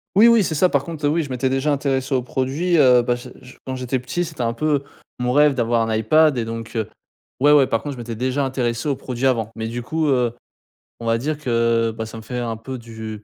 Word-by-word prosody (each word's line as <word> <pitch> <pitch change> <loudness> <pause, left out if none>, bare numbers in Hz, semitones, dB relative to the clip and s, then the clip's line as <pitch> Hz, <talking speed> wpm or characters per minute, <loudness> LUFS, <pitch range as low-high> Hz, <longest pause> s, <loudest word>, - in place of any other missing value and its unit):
Oui, 220 +4 +7
oui 235 -3 +5
c'est 165 - -2
ça 180 +4 +3
par 140 -4 +1
contre, 155 -1 -5
heu, - - +4
oui 165 +1 +1
je 140 - -8
m'étais 130 +1 0
déjà 135 +3 0
intéressé 135 -1 -1
au 130 - +2
produit, 135 +8 0
heu, 125 -4 +6
bah, 120 0 0
je 120 - -10
je 125 - -14
quand 130 - -4
j'étais 130 0 -2
petit, 130 +8 -3
c'était 155 -7 -5
un 115 0 0
peu 145 +2 0 0.3
mon 125 0 -1
rêve 145 0 +5
d'avoir 115 -1 +1
un 110 - 0
iPad 145 +6 +4
et 115 - -1
donc 115 0 -6 0.6
ouais, 145 +3 +5
ouais. 145 -3 +6
Par 115 -2 -1
contre 145 -1 -5
je - - -11
m'étais 115 -1 -5
déjà 130 +4 -1
intéressé 125 -1 -2
aux 140 - +1
produits 125 0 -4
avant 115 -4 +1
mais 110 0 -4
du 120 +2 -4
coup, 155 +6 -1
heu, 125 -3 +2 0.7
on 115 - -6
va 115 0 +2
dire 150 +5 -3
que, 115 -4 +1
bah, 110 - -3
ça 110 - -9
me 110 - -8
fait 125 +3 -6
un 115 -2 -3
peu 130 +3 -7
du 110 -2 -8
130 Hz, 260 wpm, -21 LUFS, 115-145 Hz, 0.7 s, Oui